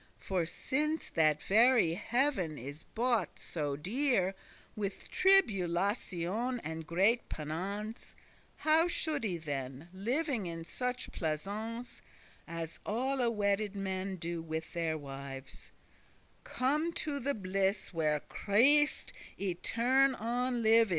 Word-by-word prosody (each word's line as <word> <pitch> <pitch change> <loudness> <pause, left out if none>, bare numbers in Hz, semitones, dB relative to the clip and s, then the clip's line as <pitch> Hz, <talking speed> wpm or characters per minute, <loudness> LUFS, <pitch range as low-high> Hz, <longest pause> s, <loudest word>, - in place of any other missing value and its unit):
For 180 -4 -1
since 305 - -1
that 155 -3 +3
very 225 -4 +5
heav'n 215 - 0
is 140 +5 -8
bought 235 -4 0
so 145 -4 -3
dear, 195 - +1 0.4
With 200 -2 -4
tribulation 205 - +2
and 160 0 -5
great 200 +8 +2
penance, 195 +9 -5 0.4
How 320 +2 +4
should 315 -5 -1
I 185 -6 -1
then, 140 -1 -5
living 240 - 0
in 165 -1 -5
such 250 +8 -3
pleasance 205 +9 -4 0.5
As 165 -1 -5
alle 250 +2 +1
wedded 205 -1 0
men 190 -1 -2
do 170 -1 -3
with 160 0 -5
their 165 -2 0
wives, 135 -2 -8 0.7
Come 300 +6 0
to 290 -3 -2
the 280 +2 0
bliss 190 0 -1
where 155 -3 +1
Christ 285 +9 +3 0.2
*etern 240 +8 +2
on 245 +1 0
live 225 +1 +6
is? - - -11
200 Hz, 115 wpm, -33 LUFS, 165-250 Hz, 0.7 s, live